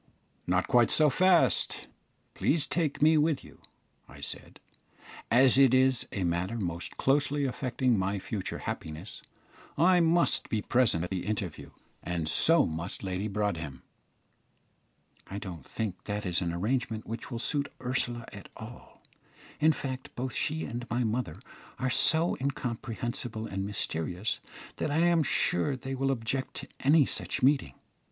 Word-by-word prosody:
"Not 95 Hz, +1 st, +1 dB
quite 120 Hz, -2 st, +4 dB
so 150 Hz, -2 st, +4 dB
fast; 170 Hz, -, +3 dB, 0.5 s
please 155 Hz, -1 st, +1 dB
take 155 Hz, -4 st, -1 dB
me 155 Hz, 0 st, +6 dB
with 150 Hz, -2 st, +1 dB
you," -, -, -16 dB, 0.5 s
I -, -, -13 dB
said. -, -, -7 dB, 0.7 s
"As 130 Hz, +3 st, +6 dB
it 130 Hz, -2 st, +6 dB
is 130 Hz, -1 st, +3 dB
a 100 Hz, -, -2 dB
matter 90 Hz, +6 st, -1 dB
most 85 Hz, -5 st, -4 dB
closely 145 Hz, +1 st, +2 dB
affecting 130 Hz, -3 st, 0 dB
my 95 Hz, +2 st, 0 dB
future 100 Hz, 0 st, -4 dB
happiness, 80 Hz, +6 st, -6 dB, 0.6 s
I 180 Hz, +4 st, +5 dB
must 170 Hz, +1 st, +3 dB
be 105 Hz, -2 st, -1 dB
present 120 Hz, -10 st, +2 dB
at 90 Hz, -, -5 dB
the 95 Hz, 0 st, -3 dB
interview, 100 Hz, -6 st, -4 dB, 0.3 s
and 85 Hz, -2 st, -3 dB
so 165 Hz, -, +5 dB
must 85 Hz, +5 st, -4 dB
Lady 95 Hz, +2 st, -2 dB
Broadhem." 85 Hz, -10 st, -3 dB, 1.4 s
"I 100 Hz, -, -6 dB
don't 90 Hz, -8 st, -8 dB
think 105 Hz, -5 st, -4 dB
that 105 Hz, 0 st, -3 dB
is 90 Hz, 0 st, 0 dB
an 85 Hz, -2 st, -1 dB
arrangement 110 Hz, +5 st, -1 dB
which 115 Hz, +1 st, -6 dB
will 120 Hz, -, -4 dB
suit 140 Hz, +4 st, -1 dB
Ursula 125 Hz, -2 st, -2 dB
at 100 Hz, -4 st, -10 dB
all. -, -, -12 dB, 0.6 s
In 155 Hz, +1 st, +5 dB
fact, 130 Hz, -3 st, -5 dB
both 130 Hz, +1 st, -3 dB
she 160 Hz, +1 st, -1 dB
and 120 Hz, 0 st, -6 dB
my 120 Hz, +1 st, 0 dB
mother 110 Hz, -8 st, -2 dB, 0.4 s
are 130 Hz, -1 st, -1 dB
so 160 Hz, +6 st, +3 dB
incomprehensible 120 Hz, -4 st, -3 dB
and 95 Hz, -2 st, -3 dB
mysterious, 90 Hz, 0 st, -2 dB, 0.4 s
that -, -, -1 dB
I 145 Hz, -, 0 dB
am 170 Hz, -1 st, +4 dB
sure 130 Hz, -, +2 dB
they 130 Hz, +1 st, -6 dB
will 135 Hz, +1 st, 0 dB
object 130 Hz, +1 st, -2 dB
to -, -, -6 dB
any 145 Hz, +1 st, +5 dB
such -, -, -4 dB
meeting. 135 Hz, -, +3 dB
120 Hz, 150 wpm, -29 LUFS, 95-135 Hz, 1.4 s, me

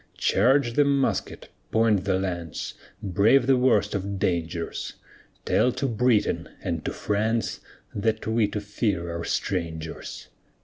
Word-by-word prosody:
Charge 125 Hz, +3 st, +3 dB
the 145 Hz, -, +5 dB
musket, 140 Hz, -1 st, 0 dB, 0.2 s
point 110 Hz, -4 st, +3 dB
the 95 Hz, -2 st, +2 dB
lance, 85 Hz, -4 st, -4 dB, 0.3 s
Brave 105 Hz, +7 st, +4 dB
the 135 Hz, +1 st, +5 dB
worst 115 Hz, -5 st, +3 dB
of 100 Hz, 0 st, -2 dB
dangers; 85 Hz, -3 st, -2 dB, 0.5 s
Tell 125 Hz, -, +3 dB
to 140 Hz, -, -2 dB
Britain 115 Hz, -2 st, +1 dB
and -, -, -2 dB
to -, -, -1 dB
France, 110 Hz, +2 st, -1 dB, 0.3 s
That 110 Hz, +1 st, -1 dB
we 110 Hz, -1 st, +2 dB
to 105 Hz, 0 st, -4 dB
fear 100 Hz, -5 st, -2 dB
are 85 Hz, -, -4 dB
strangers. 80 Hz, -4 st, -4 dB
105 Hz, 130 wpm, -25 LUFS, 95-115 Hz, 0.5 s, the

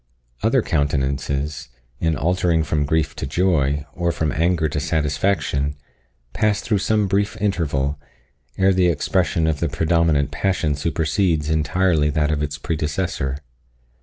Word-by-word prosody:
Other 115 Hz, +1 st, +2 dB
countenances, 70 Hz, -1 st, -1 dB, 0.3 s
in 80 Hz, -1 st, +1 dB
altering 85 Hz, +1 st, +1 dB
from 75 Hz, -1 st, 0 dB
grief 80 Hz, +1 st, 0 dB
to -, -, -3 dB
joy, 75 Hz, -3 st, +1 dB
or 85 Hz, -1 st, 0 dB
from 80 Hz, -2 st, -1 dB
anger 85 Hz, 0 st, +1 dB
to 75 Hz, 0 st, -2 dB
satisfaction, 75 Hz, -2 st, 0 dB, 0.6 s
pass 105 Hz, -1 st, +1 dB
through 105 Hz, -3 st, 0 dB
some 105 Hz, +1 st, +1 dB
brief 100 Hz, +2 st, 0 dB
interval, 75 Hz, -8 st, -1 dB, 0.6 s
ere 95 Hz, 0 st, +4 dB
the 90 Hz, -1 st, +3 dB
expression 85 Hz, -1 st, +1 dB
of 80 Hz, -2 st, 0 dB
the 85 Hz, -, 0 dB
predominant 80 Hz, -2 st, +1 dB
passion 90 Hz, -6 st, 0 dB
supersedes 80 Hz, +1 st, 0 dB
entirely 80 Hz, 0 st, +2 dB
that 75 Hz, 0 st, +1 dB
of 75 Hz, -1 st, -1 dB
its 75 Hz, -1 st, -3 dB
predecessor. 75 Hz, -3 st, -2 dB
80 Hz, 135 wpm, -21 LUFS, 75-90 Hz, 0.6 s, ere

